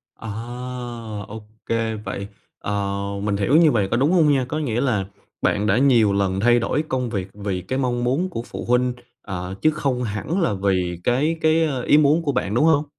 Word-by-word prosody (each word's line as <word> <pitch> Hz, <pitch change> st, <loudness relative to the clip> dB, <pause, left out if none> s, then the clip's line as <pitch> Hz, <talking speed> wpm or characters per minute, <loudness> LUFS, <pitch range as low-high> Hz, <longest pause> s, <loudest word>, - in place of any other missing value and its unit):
À! 115 Hz, -, -8 dB, 1.0 s
Ô 110 Hz, +1 st, -8 dB, 0.2 s
kê. 115 Hz, -1 st, -1 dB
Vậy, 100 Hz, -1 st, -5 dB, 0.3 s
ờ, 100 Hz, -1 st, -2 dB, 0.2 s
mình 105 Hz, -1 st, 0 dB
hiểu 105 Hz, +9 st, +2 dB
như 160 Hz, -2 st, +6 dB
vầy 105 Hz, -5 st, +1 dB
có 115 Hz, -, 0 dB
đúng 140 Hz, +6 st, +2 dB
hông 160 Hz, -5 st, +4 dB
nha, 135 Hz, -2 st, +2 dB
có 155 Hz, -, -2 dB
nghĩa 120 Hz, -5 st, -1 dB
là 110 Hz, -8 st, +1 dB, 0.4 s
bạn 105 Hz, +1 st, +1 dB
đã 105 Hz, +2 st, +3 dB
nhiều 120 Hz, -7 st, +4 dB
lần 95 Hz, -1 st, 0 dB
thay 120 Hz, +3 st, +4 dB
đổi 145 Hz, +5 st, 0 dB
công 125 Hz, -2 st, -1 dB
việc 100 Hz, -4 st, -3 dB
vì 100 Hz, -3 st, -3 dB
cái 130 Hz, +9 st, -3 dB
mong 120 Hz, -2 st, 0 dB
muốn 140 Hz, +10 st, 0 dB
của 115 Hz, -, -4 dB
phụ -, -, -7 dB
huynh, 125 Hz, +1 st, +2 dB, 0.3 s
ờ, 90 Hz, -1 st, -5 dB
chứ 155 Hz, -, +4 dB
không 135 Hz, -5 st, -1 dB
hẳn 120 Hz, -, -2 dB
là 165 Hz, -, +1 dB
vì 95 Hz, -3 st, 0 dB
cái 150 Hz, +7 st, +1 dB
cái, 160 Hz, +1 st, +3 dB
ơ, 135 Hz, -5 st, -2 dB
ý 145 Hz, -, +5 dB
muốn 155 Hz, +2 st, +4 dB
của 145 Hz, -, 0 dB
bạn, 115 Hz, -6 st, -1 dB
đúng 135 Hz, +7 st, +3 dB
hông? 155 Hz, -2 st, +3 dB
120 Hz, 215 wpm, -22 LUFS, 100-145 Hz, 1.0 s, như